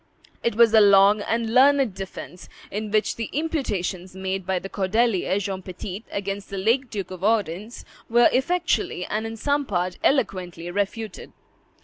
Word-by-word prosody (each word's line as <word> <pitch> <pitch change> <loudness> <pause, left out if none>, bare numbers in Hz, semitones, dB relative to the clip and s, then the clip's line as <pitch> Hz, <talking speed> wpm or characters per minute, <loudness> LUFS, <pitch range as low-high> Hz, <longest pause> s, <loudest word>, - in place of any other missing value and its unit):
It 235 - 0
was 230 -1 +5
a 220 - +7
long 200 +1 +6
and 225 +1 -1
learned 270 -3 +5
defence, 190 -1 -9 0.2
in 210 +1 -3
which 215 +1 +1
the 230 - -4
imputations 205 - -2
made 190 -1 -4
by 190 -1 +1
the 185 - -5
cordelier, 195 0 +1
John 195 -2 -3
Petit, 185 +3 -7
against 200 0 -4
the 200 - -5
late 230 +6 +1
Duke 195 -4 -5
of 185 0 -8
Orleans, 210 0 -1 0.2
were 240 +1 +6
effectually 265 - 0
and 220 +1 -2
in 225 0 -7
some 285 +5 0
parts 180 -6 -2
eloquently 185 - 0
refuted. 205 +2 -4
205 Hz, 155 wpm, -24 LUFS, 190-230 Hz, 0.2 s, a